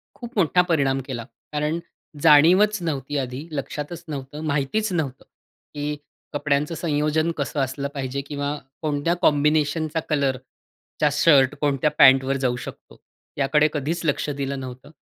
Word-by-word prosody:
खूप 240 -2 -10
मोठा 180 -1 +4
परिणाम 135 -5 +2
केला. 120 -3 -4 0.3
कारण 150 +2 -1 0.4
जाणीवच 175 +8 +6
नव्हती, 145 -4 -3
आधी 130 +3 -4
लक्षातच 150 +3 -5
नव्हतं, 145 0 -6
माहितीच 150 +10 0
नव्हतं, 140 -6 -2 0.5
की 150 0 -3 0.4
कपड्यांचं 145 +2 0
संयोजन 155 0 0
कसं 145 0 -2
असलं 135 +1 -1
पाहिजे 135 0 -3
किंवा 145 0 -3 0.2
कोणत्या 150 +2 0
कॉम्बिनेशनचा, 150 +1 +2
कलरचा 140 +1 -2
शर्ट, 145 -3 +4
कोणत्या 145 0 +2
पॅंटवर 135 +1 +6
जाऊ 125 -1 +1
शकतो, - - -11 0.4
याकडे 150 +2 +3
कधीच 155 +3 -2
लक्ष 150 0 0
दिलं 140 -1 -3
नव्हतं. 130 +2 -9
145 Hz, 130 wpm, -23 LUFS, 135-155 Hz, 0.5 s, जाणीवच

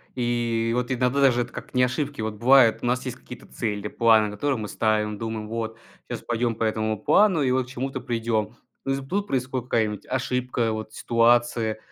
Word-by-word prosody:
И 120 -2 0
вот 125 +1 -1
иногда 125 +1 +1
даже 125 -3 +4
эт 120 0 -5
как - - -9
не 125 -1 +3
ошибки, 140 0 -1
вот 110 -1 -3
бывает, 120 0 +5
у - - -4
нас 125 +1 0
есть 125 -1 -5
какие-то 125 +1 -12
цели, 105 -2 -3
планы, 110 -2 +4
которые 130 +6 -1
мы 105 -1 -4
ставим, 105 0 0
думаем: 110 -1 -5
"Вот 115 -1 -4 0.3
щас - - -4
пойдем 120 -1 -1
по 115 - -3
этому 110 0 0
плану 185 - +3
и 130 - +1
вот 130 0 +1
к - - -15
чему-то 130 +1 -4
придем". 115 -3 -2 0.3
Но 135 - 0
из 135 - -2
м, 135 - -10
тут 200 +5 -1
происходит 130 -1 -2
какая-нибудь 105 -3 0
ошибка, 125 -2 -1
вот 110 0 -5
ситуация. 115 -1 +2
120 Hz, 200 wpm, -24 LUFS, 110-130 Hz, 0.3 s, бывает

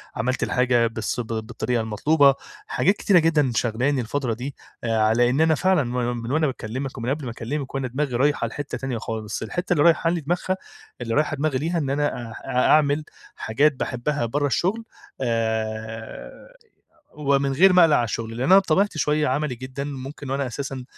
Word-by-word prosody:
عملت 125 +3 -1
الحاجة 125 -2 +2
بالس 110 +1 -3
ب 120 - -3
بالطريقة 110 +1 -2
المطلوبة، 140 +6 +3 0.3
حاجات 195 +4 +2
كتيرة 190 -4 +4
جدًا 155 -5 +2
شاغلاني 125 +5 +1
الفترة 120 +1 -2
دي 130 +5 -6 0.3
آآ 115 -1 0
ع 110 0 +3
لإن 120 +5 +3
أنا 160 0 +4
فعلًا 185 -1 +2
من 120 0 -2
من 115 +2 -5
وأنا 155 +1 +2
باكلمِك، 130 +1 -5
ومن 120 +1 -3
قبل 145 0 -2
ما 120 - -4
أكلمِك 135 +5 -5
وأنا 135 -2 -1
دماغي 130 0 -2
رايحة 145 +4 +1
لحتة 145 -1 -5
تانية 135 -3 -3
خالص، 110 -1 -5
الحتة 175 - -2
اللي 145 - +3
رايحة 165 0 +4
لي 170 -1 -1
دماغها 175 +5 -1 0.4
اللي 115 -2 -2
رايحة 150 0 +1
دماغي 145 -1 0
ليها 165 +6 -1
إن 145 -5 -1
أنا 140 -4 -1
آآ، - - -9
أ 125 -1 +1
أعمل 150 0 +4 0.3
حاجات 145 +7 +2
باحبها 130 +1 -2
برا 145 +5 0
الشغل، 190 +11 0 0.4
آآ 110 - -3 0.6
ومن 140 -2 +1
غير 185 +8 +6
ما 180 -1 +7
اقلق 160 -3 +5
على 120 -1 0
الشغل؛ 105 - -2
لأن 115 +2 -7
أنا 185 +8 +6
بطبيعتي 195 -1 +1
شوية 150 0 +1
عملي 135 0 -1
جدًا 130 +3 -6
ممكن، 140 0 -7
وأنا 140 0 -1
أساسًا، 135 +1 -5
135 Hz, 185 wpm, -23 LUFS, 120-150 Hz, 0.6 s, ما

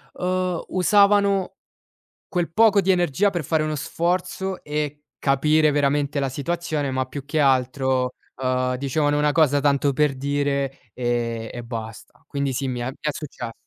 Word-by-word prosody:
uhm, 185 -1 -1
usavano 200 0 +3 0.7
quel 175 -3 -2
poco 210 +1 +5
di 190 - +3
energia 175 +1 +2
per 175 -6 -3
fare 155 +1 +1
uno 155 0 -2
sforzo 180 +5 -2
e 150 0 -3
capire 150 +2 +3
veramente 145 0 +1
la 135 - 0
situazione. 150 +1 -2
Ma 130 0 -1
più 140 +2 -7
che 150 +3 -2
altro, 130 -1 +1 0.3
uhm, 130 0 +1
dicevano 145 +3 0
una 150 0 +2
cosa 145 -3 +3
tanto 140 -1 +2
per 150 0 +2
dire 140 -2 -2
e 120 -2 -2
e 120 - -6
basta. 115 -2 -8
Quindi 140 -1 -2
sì, 135 +1 -2
mi 125 -1 -3
è 120 - -2
mi 135 - -10
è 150 - -1
successo. 125 -6 -7
145 Hz, 160 wpm, -23 LUFS, 130-165 Hz, 0.7 s, poco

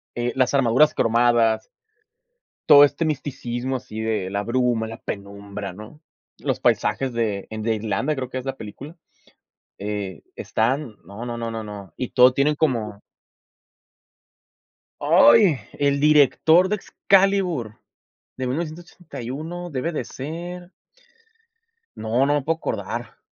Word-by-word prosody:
eh, 120 0 -1
las 130 0 +2
armaduras 135 +3 +4
cromadas 115 -1 +2 1.0
todo 145 0 +10
este 145 +3 +2
misticismo, 130 -4 -3
así 110 -2 -9
de 110 -4 -1
la 100 +1 -2
bruma, 120 -2 0
la 115 - -8
penumbra, 100 -1 -7
¿no?, 110 - -12 0.4
los - - -2
paisajes 135 -2 +1
de 110 -4 -1
en 110 - -5
de 110 +1 0
Irlanda, 110 +8 -1
creo 130 -1 -4
que 130 - -5
es 130 - -6
la 135 0 -4
película, 135 - -9 0.8
eh, 100 -3 -5
están, 120 +1 -1
no, 100 +6 -8
no, 120 - -4
no, 115 -1 -4
no, 115 -1 -5
no, 105 -2 -9
y 125 - -4
todo 125 +1 +6
tienen 140 +3 +2
como 115 -9 -1 2.0
¡Ay! 210 - +5
El 140 0 +1
director 155 +4 +5
de 210 - +1
Excalibur 190 - +1 0.6
de 130 - -2
1981 160 +1 -6
debe 150 +3 -2
de 155 - -3
ser 175 +5 -7 1.2
No, 115 +4 0
no 145 - +2
me 145 - +1
puedo 160 +4 -1
acordar. - - -5
125 Hz, 130 wpm, -23 LUFS, 110-150 Hz, 2.0 s, todo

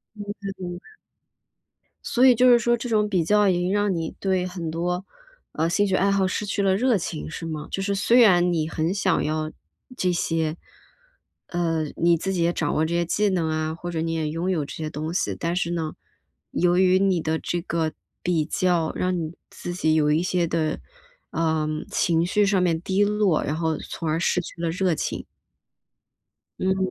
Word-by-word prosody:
明 205 - -7 0.2
白 200 - -5
明 175 -1 -5
白。 - - -19 1.1
所 250 +1 +2
以 255 - +7
就 250 +2 +5
是 240 - +7
说 240 +1 +2
这 240 +1 -5
种 210 -2 +2
比 185 -5 +1
较 210 +3 +4
已 185 - +4
经 180 +1 0
让 205 -1 +1
你 165 -2 -3
对 185 -2 0
很 175 -3 -5
多， 180 +3 -2 0.5
啊， 160 +2 0
兴 205 +4 +2
趣 190 - 0
爱 195 +1 +3
好 195 -1 +2
失 205 +3 -2
去 200 0 -1
了 190 -1 +3
热 240 +2 +3
情， 165 -3 -4
是 155 - -6
吗？ 155 -2 -5
就 195 - -2
是 200 0 0
虽 230 +5 +4
然 180 -5 +5
你 155 -2 0
很 160 +2 -1
想 190 -3 +1
要 155 0 -1 0.5
这 185 - +1
些。 165 -2 -1 1.0
呃， 165 -2 0
你 170 0 +4
自 190 +4 -2
己 180 -3 0
也 170 - +2
掌 155 -4 -1
握 155 - +2
这 170 - -2
些 170 0 +2
技 205 +5 +1
能 175 -4 0
啊， 155 0 -1
或 175 +1 -6
者 165 - -2
你 165 0 -1
也 160 -2 -1
拥 165 +4 -2
有 155 -5 0
这 140 - -8
些 155 -1 -4
东 155 +2 -4
西。 180 - -1
但 170 +1 -1
是 170 -1 -1
呢， 160 -2 -3 0.6
由 175 0 +2
于 185 0 +4
你 190 -3 +2
的 160 0 -1
这 175 - -2
个 165 -3 -1 0.3
比 170 -3 +1
较， 170 0 +1
让 180 -1 0
你 160 +1 -5 0.2
自 175 - -6
己 160 -3 +2
有 150 -1 +3
一 160 - +2
些 180 -1 +1
的， 160 -1 -1 0.5
呃， 160 -2 0 0.2
情 165 -1 +2
绪 205 +3 +2
上 195 -2 +2
面 165 -2 +1
低 190 +3 +1
落， 205 -5 +2
然 150 - -2
后 160 -1 0
从 165 - -5
而 155 +2 0
失 180 +1 +2
去 170 0 -8
了 165 - 0
热 180 0 +1
情。 - - -4 1.3
嗯。 190 0 +1
175 Hz, 225 characters per minute, -24 LUFS, 160-190 Hz, 1.3 s, 以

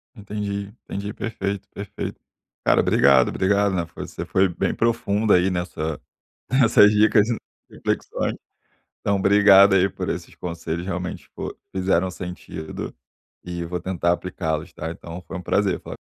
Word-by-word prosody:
Entendi, 100 -1 -4 0.2
entendi. 100 +1 -5
Perfeito, 100 -4 -4
perfeito. 100 -1 -6 0.5
Cara, - - +5
obrigado. 70 -2 +5
Obrigado, 100 +1 +2
né, 85 -2 0
você - - -6
foi 95 0 +3
bem 85 - -1
profundo 110 -2 +2
aí 90 +2 +4
nessa 85 -3 -3 0.5
nessas 115 -5 +6
dicas 105 0 +4
e 115 - 0 0.4
reflexões. - - -2 0.7
Então, 100 - +1
obrigado 100 0 +7
aí 95 +1 +4
por - - -4
esses - - -5
conselhos, 85 0 -4
realmente 90 -1 -4
fo - - -5 0.2
fizeram 95 -1 +1
sentido 90 -3 -7 0.5
e 85 -1 -4
vou 90 +1 -3
tentar 85 -2 0
aplicá-los, 80 -2 -3
tá? 80 +1 -5
Então, 85 +1 -8
foi 95 - -5
um - - -6
prazer 95 +2 +1
falar - - -8
95 Hz, 140 wpm, -23 LUFS, 85-100 Hz, 0.7 s, obrigado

